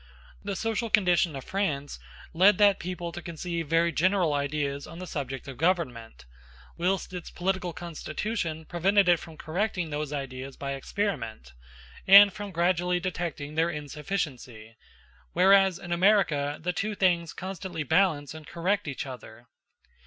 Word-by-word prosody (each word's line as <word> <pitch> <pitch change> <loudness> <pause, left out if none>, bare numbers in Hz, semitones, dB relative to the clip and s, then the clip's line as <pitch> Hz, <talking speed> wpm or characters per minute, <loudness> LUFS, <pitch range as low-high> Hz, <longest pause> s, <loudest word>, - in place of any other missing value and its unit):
The 200 0 -3
social 225 +2 -2
condition 180 -6 +3
of 135 - -6
France 150 - -2 0.3
led 185 +3 +5
that 205 -2 +5
people 175 -1 -5
to 175 - -7
conceive 170 -1 -4
very 165 +2 +3
general 180 -2 +2
ideas 140 0 -2
on 165 - -10
the 185 - -6
subject 135 -5 -5
of 135 -3 -8
government, 125 - -1 0.5
whilst 185 +1 -1
its 180 -2 -6
political 185 -1 -2
constitution 165 0 -4
prevented 190 +4 +2
it 175 -2 +5
from 160 -2 -11
correcting 180 0 -2
those 150 0 -3
ideas 135 -2 -6
by 140 0 -4
experiment, 135 - -3 0.5
and 200 0 +9
from 205 0 -6
gradually 180 0 +1
detecting 170 -5 -4
their 165 +2 +2
insufficiency; 145 - -5 0.6
whereas 190 0 +5
in 175 - -9
America 170 -6 +2
the 180 +2 -2
two 210 +4 -2
things 175 -4 +2
constantly 185 -3 -5
balance 160 -2 +2
and 155 -1 -11
correct 185 +3 -1
each 140 -1 -4
other. 120 -3 -10
170 Hz, 145 wpm, -27 LUFS, 145-190 Hz, 0.6 s, and